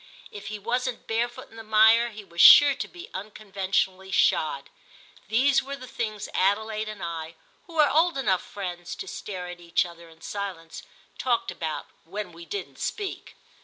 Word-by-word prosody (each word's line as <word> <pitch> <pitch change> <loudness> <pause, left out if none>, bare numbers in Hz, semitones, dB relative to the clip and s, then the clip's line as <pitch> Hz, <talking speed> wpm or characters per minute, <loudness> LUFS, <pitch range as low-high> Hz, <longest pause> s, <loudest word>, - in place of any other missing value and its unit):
If 205 - -9
he 215 - -4
wasn't 245 +3 -2
barefoot 240 +3 -2
in 225 - -14
the 225 - -8
mire 220 +2 +5
he 215 -2 -10
was 170 -3 -2
sure 290 -1 +10
to 270 - -5
be 355 +4 -12
unconventionally 190 -2 -2
shod. 150 -6 +1 0.6
These 260 +6 +3
were 275 +1 -6
the 255 -2 -10
things 215 -4 -4
Adelaide 215 +3 +1
and 210 -2 -7
I, 165 -1 -5 0.3
who 340 - -13
were 305 -2 +6
old 325 +2 +3
enough 190 -9 +1
friends 180 -3 -6
to - - -7
stare 185 -1 -6
at 180 0 -8
each 170 +2 +1
other 170 -1 -12
in 165 0 -19
silence, 185 -6 -6 0.4
talked 245 -3 0
about 160 -2 -4 0.2
when 195 +2 -6
we 170 0 -12
didn't 165 -6 -6
speak. 405 -3 -4
205 Hz, 170 wpm, -26 LUFS, 180-235 Hz, 0.6 s, sure